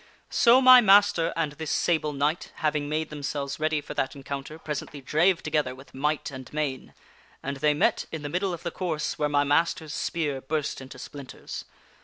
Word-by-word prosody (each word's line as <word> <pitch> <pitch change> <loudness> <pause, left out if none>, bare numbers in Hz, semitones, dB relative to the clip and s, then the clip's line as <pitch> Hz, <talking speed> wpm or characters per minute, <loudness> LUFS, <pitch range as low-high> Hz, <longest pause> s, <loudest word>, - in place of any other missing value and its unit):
" - - -35
So 245 +2 +6
my 255 -1 +9
master 195 -5 +5
and 160 -3 0
this 155 +1 -6
Sable 155 -2 +1
Knight, 145 +4 -1
having 150 -1 -1
made 155 +1 -2
themselves 140 -1 -4
ready 155 -1 0
for - - -8
that 135 - -2
encounter, 140 +2 -6
presently 150 -2 -5
drave 165 +7 +2
together 150 -4 0
with 135 +1 -15
might 150 +2 -1
and 130 -1 -9
main. 145 -4 -3 0.5
And 140 0 -3
they 150 +1 +2
met - - +1
in 160 -2 -5
the - - -3
middle 180 +5 -1
of 175 -1 -6
the 170 - -3
course, 160 -5 -3
where 150 -1 +1
my 145 0 +3
master's 155 +1 +1
spear 145 -5 -2
burst 150 0 -2
into 130 0 -10
splinters. 140 +1 -8
150 Hz, 190 wpm, -26 LUFS, 140-160 Hz, 0.5 s, my